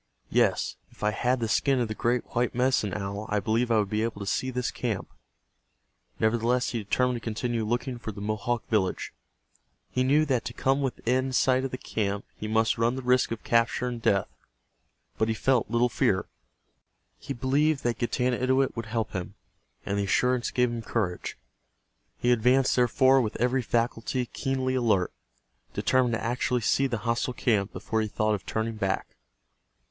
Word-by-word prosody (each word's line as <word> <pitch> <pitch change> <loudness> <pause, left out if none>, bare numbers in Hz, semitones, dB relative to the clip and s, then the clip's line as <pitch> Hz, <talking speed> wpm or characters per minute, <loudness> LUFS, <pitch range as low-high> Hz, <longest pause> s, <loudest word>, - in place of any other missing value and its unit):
Yes, - - +2
if - - -14
I 105 - +3
had 125 +5 0
the 115 - -1
skin 135 +5 +2
of 120 - +1
the 110 - -3
great 120 +2 0
white 120 0 0
Medicine 125 -5 +2
Owl 100 +1 -4
I 105 - +1
believe 115 +4 0
I 115 - +3
would 105 -2 0
be 105 0 +1
able 115 -2 -2
to 100 - -5
see 130 +6 -1
this 125 -1 -2
camp." 115 -6 -3 1.1
Nevertheless 120 +3 +2
he 120 - -2
determined 125 +4 +1
to 115 - -10
continue 115 +1 -2
looking 120 +3 -2
for 115 -1 -5
the 100 - -9
Mohawk 110 +3 -2
village. 105 -5 0 0.8
He 130 - +1
knew 145 +4 +4
that 130 -5 0
to 115 - -4
come 135 +3 +1
within 130 0 0
sight 130 +1 +3
of - - -2
the 130 - -5
camp 100 -4 -2
he 110 - -6
must 110 +1 +2
run 115 +2 +2
the 130 - -5
risk 125 0 +3
of 115 -1 -5
capture 115 +1 +2
and 120 -2 -4
death, 100 -3 +2 0.9
but 110 - +2
he 110 - 0
felt 125 0 +1
little 120 +1 +3
fear. 115 - +1 0.9
He - - -8
believed 140 +4 +1
that 120 -1 -1
Getanittowit 130 +2 +1
would 115 -1 -5
help 110 -1 -2
him, 90 -3 -5 0.5
and 100 0 -1
the 100 - 0
assurance 125 +4 +1
gave 125 -1 +1
him 120 -1 -4
courage. 105 -5 -2 0.8
He 120 - +2
advanced, 125 +3 +3
therefore, 130 +2 +4
with 110 -3 -2
every 125 +2 +2
faculty 120 +2 -1
keenly 130 +1 -2
alert, 110 -8 +1 0.6
determined 125 -3 +2
to - - -4
actually 120 +1 0
see 135 +5 +2
the 120 -3 -2
hostile 120 +2 0
camp 105 -5 +1
before 110 -1 -2
he 110 - -1
thought 110 +1 0
of 100 - -4
turning 110 0 -2
back. 95 -3 -2
120 Hz, 180 wpm, -27 LUFS, 110-125 Hz, 1.1 s, knew